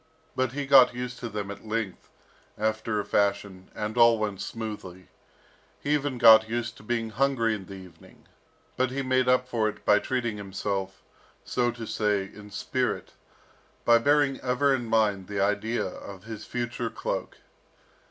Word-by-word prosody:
But 130 -1 0
he 145 0 -3
got 130 -3 +7
used 125 0 -5
to 120 - -5
them 105 -2 -4
at 100 - -10
length, 110 -4 -4 0.5
after 110 0 -1
a 100 - -3
fashion, 100 -2 -1
and 105 0 -3
all 115 -1 +7
went 105 -3 -3
smoothly. 105 -5 -7 0.7
He 145 - -1
even 145 -3 0
got 110 -2 +8
used 120 0 -3
to - - -14
being 115 0 -2
hungry 120 -2 +1
in 95 -4 -6
the 100 - -8
evening, 90 -3 -15 0.5
but 130 0 +1
he 135 +1 -3
made 130 0 +2
up 125 0 +3
for 115 -4 0
it - - -11
by 105 0 +5
treating 120 -4 -2
himself, 95 -1 -4 0.4
so 120 -1 +1
to 120 -1 -6
say, 105 -2 0
in 105 +1 -12
spirit, 100 - -2 0.7
by 120 0 +6
bearing 145 +1 +2
ever 130 +2 +2
in 120 -3 -2
mind 105 -4 +1
the 100 -1 -3
idea 105 +4 0
of 95 0 -9
his 110 -1 -8
future 120 -1 -3
cloak. - - -4
110 Hz, 165 wpm, -27 LUFS, 105-125 Hz, 0.7 s, got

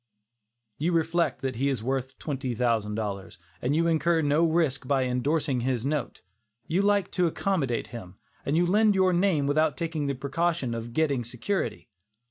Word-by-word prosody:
You 170 +4 +1
reflect 165 -2 +1
that 130 -3 -2
he 140 +3 +1
is 130 -6 -2
worth 130 +1 -2
twenty 135 -5 -3
thousand 110 -3 0
dollars, 100 -3 -4 0.2
and 130 +4 0
you 165 +1 +2
incur 165 0 +2
no 145 +3 +3
risk 160 -6 +1
by 135 -1 +2
indorsing 135 +2 0
his 125 -1 -1
note; 145 -2 -2 0.4
you 180 +4 +1
like 200 -1 +2
to 180 -2 +2
accommodate 160 -8 -1
him, 95 -6 -8 0.3
and 145 +3 0
you 175 - +4
lend 210 +3 +4
your 185 -1 +3
name 175 -5 +2
without 150 -1 +2
taking 160 -2 -2
the 140 - -1
precaution 140 0 -1
of 115 0 -5
getting 140 -4 +1
security. 125 - -3
145 Hz, 170 wpm, -27 LUFS, 125-170 Hz, 0.4 s, you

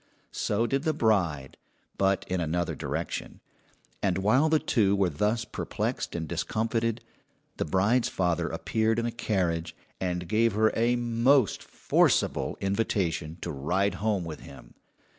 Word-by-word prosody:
So 110 +3 0
did 135 +3 0
the 155 -1 0
bride, 85 - 0 0.4
but 95 0 +1
in 90 -1 -1
another 85 +1 -1
direction; - - -4 0.6
and 95 -3 +1
while 125 +11 +3
the 155 - +4
two 100 -9 +2
were 95 -3 +1
thus 105 +9 0
perplexed - - -3
and 80 -2 -3
discomfited, 115 +7 -1 0.6
the - - -1
bride's 100 +9 +2
father 90 -3 0
appeared 110 0 0
in 115 - 0
a 120 - -1
carriage, 85 -8 -1 0.2
and 90 -1 -2
gave 115 +2 +2
her 110 +1 +3
a 120 +2 +2
most 120 +1 +2
forcible - - +1
invitation 95 -5 -1
to 85 - -4
ride 90 +8 0
home 105 -5 0
with 80 -2 -6
him. - - -13
100 Hz, 140 wpm, -28 LUFS, 90-115 Hz, 0.6 s, the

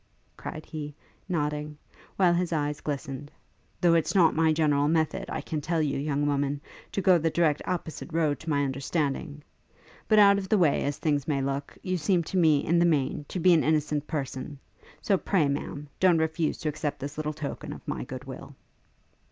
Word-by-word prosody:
cried 155 - -7
he, 150 -2 -6 0.3
nodding, 150 -2 -2 0.4
while 180 -3 +4
his 175 0 0
eyes 150 -2 -1
glistened; 140 -1 -5 0.5
'though 175 -1 +4
it's 165 +3 +1
not 170 -4 +5
my 160 0 +3
general 150 -2 +2
method, 160 +4 +1
I - - -3
can 155 -3 -4
tell 165 +3 -1
you, 145 -3 0
young 145 0 0
woman, 145 0 0 0.3
to 195 - -1
go 180 -2 +6
the 165 +1 +1
direct 155 -3 +2
opposite 170 -2 -4
road 155 -3 +1
to 160 - -7
my 145 -2 +2
understanding. 140 +2 -2 0.6
But, 215 - +4
out 200 -1 +7
of 190 -1 -6
the 215 - +4
way 165 -6 +3
as 145 0 -2
things 145 -3 0
may 145 -3 +1
look, 140 +1 -3
you 185 -1 -1
seem 175 +2 +1
to 185 - -3
me, 155 -5 +4
in 170 +1 +3
the - - +4
main, 145 -2 0
to 185 - -3
be 180 +1 +5
an 160 - +4
innocent 150 -1 0
person; 140 -2 -4 0.5
so 195 -3 +2
pray, 175 -8 +2
Ma'am, 145 +1 -4
don't 180 -3 +5
refuse 160 0 0
to 155 - 0
accept 150 -1 -3
this 145 +2 -6
little 155 0 -2
token 150 -2 -6
of - - -10
my - - -3
good - - -7
will.' - - -9
155 Hz, 195 wpm, -27 LUFS, 145-170 Hz, 0.6 s, out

